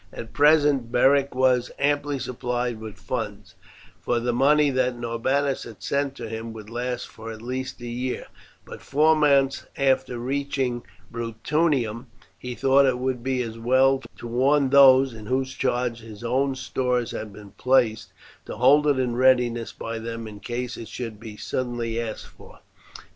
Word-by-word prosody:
At 115 -1 -9
present 145 -4 +4
Beric 135 +2 +3
was 125 -1 +2
amply 145 0 0
supplied 125 -2 -3
with 110 -2 -9
funds, 105 -6 -5 0.5
for 120 - 0
the 120 +1 -1
money 145 +3 +4
that 125 -1 0
Norbanus 130 +4 -1
had 115 -3 -12
sent 140 -1 -1
to 115 - -7
him 110 +1 -6
would 110 -1 -10
last 125 +1 -3
for 115 0 -9
at 110 - -9
least 130 +2 -4
a - - -7
year; 125 +2 -3 0.4
but, - - -10
four 155 +3 +3
months 140 -2 +2
after 135 -3 +1
reaching 130 -1 -2 0.3
Bruttium, 120 +1 -1 0.3
he 125 -1 -6
thought 135 +2 +4
it 125 -1 +1
would 130 -1 -2
be 130 0 -1
as 115 -1 -7
well 130 +3 +3 0.2
to - - -10
warn 135 +3 +2
those 135 -2 +7
in 110 -2 -10
whose 130 +1 -1
charge 125 -3 -1
his 110 -1 -11
own 135 +3 0
stores 125 -2 -1
had 110 - -6
been 100 0 -13
placed, 110 -1 +1 0.4
to - - -6
hold 140 +5 +5
it 145 -2 +3
in 125 -2 0
readiness 125 -2 +2
by 115 0 -6
them 115 0 -6
in 105 -1 -10
case 120 +3 -4
it 115 - -8
should 115 -4 -6
be 110 -2 -9
suddenly 120 -2 -3
asked 110 -2 -6
for. - - -17
125 Hz, 165 wpm, -24 LUFS, 115-135 Hz, 0.5 s, those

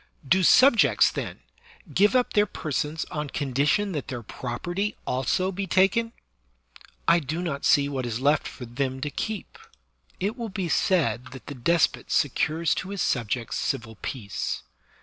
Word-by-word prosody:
Do 190 +7 +4
subjects, 245 +6 +6
then, - - -5 0.5
give 205 - +4
up 250 -1 +2
their 210 0 +4
persons 155 -1 -3
on 150 -1 -3
condition 145 +10 +1
that 150 -6 -4
their 120 -3 -5
property 175 - -4
also 135 +9 0
shall - - -3
be 195 +1 -4
taken? 195 +6 +3 1.0
I 170 +1 +6
do 155 +2 -4
not 145 -5 -3
see 140 -1 +4
what 135 -3 -3
is 115 0 -3
left 145 +3 +2
for 125 - -8
them 130 +2 -3
to 145 +1 -2
keep. 215 +5 -5 0.6
It 205 +4 -1
will 235 -3 -5
be 190 -3 -3
said 135 - +1
that 130 - -11
the 145 - -6
despot 165 +6 +1
secures 155 +3 +1
to 185 - -9
his 200 -1 -2
subjects 115 -1 -1
civil 110 -1 -2
peace. 105 -7 -4
150 Hz, 160 wpm, -26 LUFS, 130-190 Hz, 1.0 s, subjects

